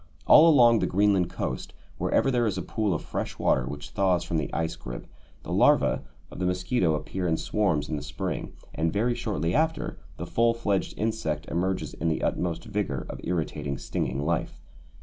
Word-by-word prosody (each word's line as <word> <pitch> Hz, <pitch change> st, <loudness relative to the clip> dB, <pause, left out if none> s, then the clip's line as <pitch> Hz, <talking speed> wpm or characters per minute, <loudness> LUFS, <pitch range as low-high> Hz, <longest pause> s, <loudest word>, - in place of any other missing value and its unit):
All 160 Hz, +2 st, +8 dB
along 120 Hz, -6 st, +6 dB
the -, -, +1 dB
Greenland 95 Hz, -2 st, +2 dB
coast, 65 Hz, -, -4 dB, 0.3 s
wherever 135 Hz, -, +2 dB
there 120 Hz, -2 st, +2 dB
is 95 Hz, -3 st, -1 dB
a -, -, -2 dB
pool 110 Hz, -3 st, -1 dB
of -, -, -4 dB
fresh -, -, -4 dB
water 65 Hz, -2 st, +2 dB
which 70 Hz, +2 st, -7 dB
thaws 95 Hz, -3 st, +2 dB
from 85 Hz, -, -2 dB
the 75 Hz, -, -2 dB
ice 80 Hz, -1 st, -1 dB
grip, -, -, -8 dB, 0.4 s
the -, -, -6 dB
larvæ -, -, +4 dB, 0.3 s
of -, -, -9 dB
the 90 Hz, -, 0 dB
mosquito 90 Hz, -1 st, +1 dB
appear 90 Hz, +4 st, -3 dB
in 80 Hz, -1 st, +1 dB
swarms 80 Hz, -9 st, 0 dB
in 80 Hz, -, -2 dB
the -, -, -5 dB
spring, 70 Hz, 0 st, -4 dB, 0.2 s
and, 80 Hz, +1 st, 0 dB
very 115 Hz, +6 st, +1 dB
shortly 85 Hz, -8 st, -2 dB
after, 155 Hz, 0 st, 0 dB, 0.2 s
the 85 Hz, -, -5 dB
full 115 Hz, +6 st, +2 dB
fledged 100 Hz, -4 st, -1 dB
insect 105 Hz, -9 st, -2 dB
emerges 95 Hz, +2 st, -1 dB
in 85 Hz, -, -3 dB
the 80 Hz, -, -1 dB
utmost 85 Hz, -2 st, -1 dB
vigour 95 Hz, -11 st, -2 dB
of -, -, -8 dB
irritating 75 Hz, -5 st, -2 dB
stinging 70 Hz, 0 st, -2 dB
life. 85 Hz, 0 st, -1 dB
90 Hz, 190 wpm, -27 LUFS, 75-110 Hz, 0.4 s, All